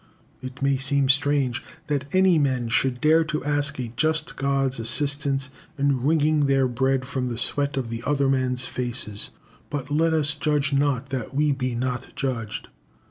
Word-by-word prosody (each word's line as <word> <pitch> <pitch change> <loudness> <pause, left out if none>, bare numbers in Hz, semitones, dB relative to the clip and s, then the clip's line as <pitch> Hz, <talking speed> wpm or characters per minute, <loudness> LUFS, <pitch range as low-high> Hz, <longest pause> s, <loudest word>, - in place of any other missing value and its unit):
It 130 +1 -7
may 140 -1 +2
seem 135 0 +1
strange 135 -3 +1 0.2
that 140 -2 -1
any 185 -3 +4
men 130 -5 0
should 125 +2 +1
dare 160 +3 +4
to 155 -1 -3
ask 145 -1 0
a 120 -2 -5
just 155 +3 0
God's 135 -2 0
assistance 140 +3 0 0.3
in 140 -2 +1
wringing 150 +1 +2
their 135 -1 +3
bread 130 +1 0
from 130 -1 -3
the 120 -2 -4
sweat 140 +3 +3
of 120 -3 -3
other 140 0 +1
men's 130 -1 +1
faces; 115 -4 -3 0.4
but 145 -1 -5
let 160 +2 +2
us 150 -2 +4
judge 150 -1 0
not 140 -2 +1
that 130 -1 -4
we 150 +1 +2
be 130 -3 -2
not 125 +1 -3
judged. 115 -6 -3
135 Hz, 165 wpm, -24 LUFS, 130-145 Hz, 0.4 s, any